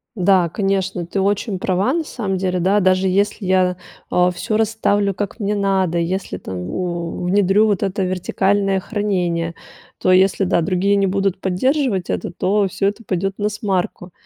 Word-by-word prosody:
Да, 185 -2 +3
конечно, 195 -1 -1
ты 185 +4 -3
очень 200 0 0
права 190 +6 +1
на 325 +2 -1
самом 200 -9 -3
деле, 185 -1 -1
да. 195 +4 +3
Даже 185 0 +2
если 200 +2 0
я, 185 -1 +2 0.3
а, 180 0 +3
всё 215 +4 -3
расставлю, 205 -2 +1
как 205 +4 -5
мне 205 +1 0
надо, 190 -4 +1
и 170 - +1
если 190 +3 -3
там, 95 - -7
у, 175 -1 -3
внедрю 195 +3 +3
вот 205 -3 +1
это 195 0 -1
вертикальное 195 +2 0
хранение, 180 -5 -2 0.4
то 185 - +3
если, 190 +1 +3
да, 180 -2 +2
другие 190 +3 +1
не 200 -1 +2
будут 195 0 0
поддерживать 210 - 0
это, - - -2
то 200 +3 +1
всё 195 - 0
это 205 +3 -3
пойдет 195 0 -1
насмарку. 200 -4 -2
195 Hz, 170 wpm, -19 LUFS, 180-205 Hz, 0.4 s, Да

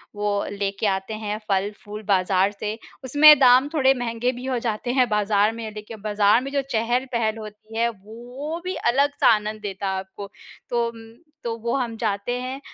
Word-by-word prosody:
वो 205 -1 -1
लेके 200 +1 -3
आते 190 +2 -2
हैं 210 0 -3
फल-फूल 205 +2 -3
बाज़ार 190 0 +3
से। 210 +1 -5 0.3
उसमें 295 +3 +8
दाम 255 +1 +6
थोड़े 270 -4 +4
महँगे 245 -1 -1
भी 250 0 -8
हो 260 -2 -1
जाते 225 +2 -2
हैं 255 -2 +3
बाज़ार 210 0 +2
में, 225 -1 -7
देखिए 215 +1 -9
बाज़ार 210 +1 +3
में 275 +1 -6
जो 280 0 +1
चहल-पहल 235 -1 0
होती 215 +1 -10
है, 235 +1 +2
वो 240 - -8
भी 370 - -2
अलग-सा 285 +3 +2
आनंद 215 0 -3
देता 195 -1 -4
आपको। 190 +1 -7 0.4
तो 235 -1 +1
अम, 225 -1 -13 0.3
तो 230 -1 -2
वो 235 +2 -2
हम 240 -4 -2
जाते 210 0 -2
हैं, 260 +2 -5
225 Hz, 175 wpm, -23 LUFS, 205-250 Hz, 0.4 s, उसमें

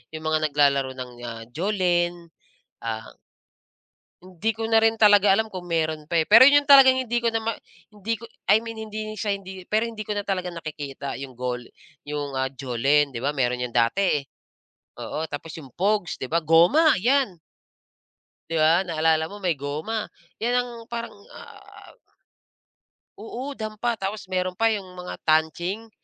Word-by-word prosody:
yung 155 - -7
mga 155 0 +1
naglalaro 140 -2 +2
ng, 125 -1 -7 0.2
ah, 115 -1 -7
jolen, 175 -1 -1 0.5
ah 110 -1 -5 1.1
Hindi 185 +4 -2
ko 225 0 -4
na 225 - +3
rin 225 0 +2
talaga 205 -2 +6
alam 220 +2 +1
kung 185 -3 -8
meron 160 -3 -1
pa, 165 +1 +1
eh. 155 - -2
Pero 230 +5 +9
'yon 285 +1 +5
talaga 270 -2 +9
hindi 245 -2 -1
ko 230 - +2
na 225 - 0
ma 225 +1 -1 0.4
hindi 215 +1 -4
ko 230 - -10 0.2
I 215 - +5
mean 230 -1 -8
hindi 215 0 -6
din 215 - -7
siya 205 0 -1
hindi 190 -1 -7
pero 220 +4 0
hindi 215 -2 -7
ko 210 - -3
na 205 - -1
talaga 185 -2 -2
nakikita 145 -4 -6
'yung 135 -1 -8
gol 125 0 -4 0.4
'yung, 145 -2 -4
ah, 130 0 -1
jolen, 135 +1 +1
'di - - -3
ba, 145 - +1
meron 125 -2 -1
'yan 120 - -6
dati. 145 +7 +2 0.8
Oo, 155 - -4
tapos 145 +3 -7
'yung 135 -6 -11
pogs, 200 -2 0
'di 130 - -4
ba, 165 - 0
goma, 175 - +5
'yan. 245 -5 +1 1.1
'Di 165 - 0
ba, 165 +4 +4
naalala 160 -1 +1
mo 205 - -9
may 180 -5 0
goma, 155 +11 -4 0.3
'yan 245 +1 +2
ang 245 0 -2 0.2
parang, 235 0 -5 0.2
ah - - -14 1.2
Oo, 250 +6 -6
dampa, 215 +1 -3
tapos 195 0 -5
meron 185 0 -1
pa 225 +3 +2
'yung 200 -3 -3
mga 180 0 -7
tanching. 170 +8 0
180 Hz, 170 wpm, -24 LUFS, 150-220 Hz, 1.2 s, Pero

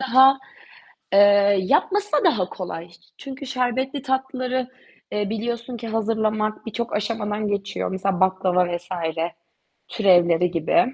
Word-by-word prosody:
daha, 265 +1 +5 0.8
eee, 200 - +6 0.4
yapması 405 - +1
da 295 - +3
daha 185 -5 +2
kolay. 170 -2 -7 0.3
Çünkü 275 0 -8
şerbetli 260 +1 -2
tatlıları, 260 -1 -2 0.4
eee, 205 -1 -1
biliyorsun 235 +2 -4
ki 230 0 -7
hazırlamak 220 -1 -1
birçok 235 +2 -4
aşamadan 210 0 -2
geçiyor. 200 -1 -2
Mesela 190 -1 -1
baklava 180 -2 +2
vs. 175 +1 -17 1.0
türevleri 175 -4 +3
gibi. 175 +9 +1
220 Hz, 115 wpm, -23 LUFS, 190-255 Hz, 1.0 s, eee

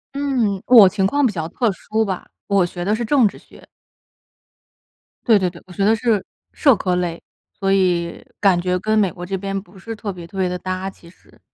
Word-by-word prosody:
嗯， 245 -9 0
我 230 -6 +9
情 190 0 +1
况 285 +7 +1
比 220 - +1
较 160 -3 -3
特 225 +5 0
殊 220 +3 -2
吧， 190 -2 -4 0.2
我 200 -2 +3
学 175 0 -6
的 210 +3 +2
是 240 - -3
政 245 -1 +4
治 - - -7
学。 - - -18 1.6
对 220 -4 +6
对 180 -1 0
对， 170 - -14
我 - - -14
学 195 +2 -1
的 220 +2 +4
是 225 -3 0 0.3
社 275 -5 +4
科 180 -2 -1
类， 175 -2 -3 0.4
所 195 -1 0
以 180 -3 0 0.2
感 190 -4 +4
觉 180 0 0
跟 215 +3 +1
美 195 -3 +3
国 175 0 -8
这 190 +1 -3
边 195 +1 -3
不 190 0 -18
是 225 +4 -7
特 205 -1 -5
别 175 -2 -10
特 195 - -11
别 185 -1 +1
地 180 - -3
搭， 185 +1 -3
其 170 -3 -16
实。 - - -23
195 Hz, 235 characters per minute, -20 LUFS, 180-215 Hz, 1.6 s, 我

